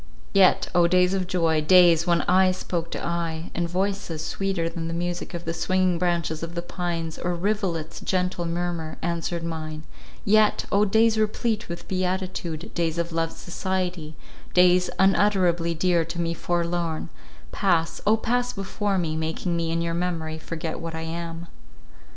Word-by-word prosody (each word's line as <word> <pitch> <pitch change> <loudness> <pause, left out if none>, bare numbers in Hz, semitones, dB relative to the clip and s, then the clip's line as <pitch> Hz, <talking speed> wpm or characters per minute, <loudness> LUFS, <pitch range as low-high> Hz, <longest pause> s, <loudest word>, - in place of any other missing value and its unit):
Yet, - - +5
O 175 -1 +5
days 180 +1 +3
of 185 -2 -1
joy—days, 165 0 +4
when 170 -1 +3
eye 185 0 +4
spoke 170 -2 -3
to - - -4
eye, 170 -1 -3
and 170 0 -1
voices, 185 -3 -2
sweeter 195 -3 -1
than 165 0 -4
the 165 - -3
music 175 +1 -3
of 170 - -6
the 165 - -2
swinging 185 +1 +1
branches 170 -3 0
of 165 +1 -6
the 170 - -3
pines, 170 -2 -3
or 175 0 -1
rivulet's 175 -4 -2
gentle 180 -2 -1
murmur, 170 -2 -3
answered 170 0 -2
mine—yet, 165 +6 -1
O 205 +1 +4
days 220 +2 +3
replete 215 0 0
with 170 - -6
beatitude, 185 -3 -3
days 165 -1 -1
of 170 0 -1
loved 165 0 -1
society—days 180 0 0
unutterably 185 -4 +3
dear 170 0 +2
to 170 +1 -6
me 170 0 0
forlorn—pass, 170 0 -2
O 220 +1 +5
pass 245 +2 0
before 195 0 -2
me, 165 -3 -1
making 160 +2 -2
me 165 -1 -1
in 165 0 0
your 170 0 -1
memory 165 -2 -2
forget 160 0 -5
what 165 -1 -5
I 160 - -4
am. 165 +1 -5
170 Hz, 150 wpm, -25 LUFS, 165-185 Hz, -, Yet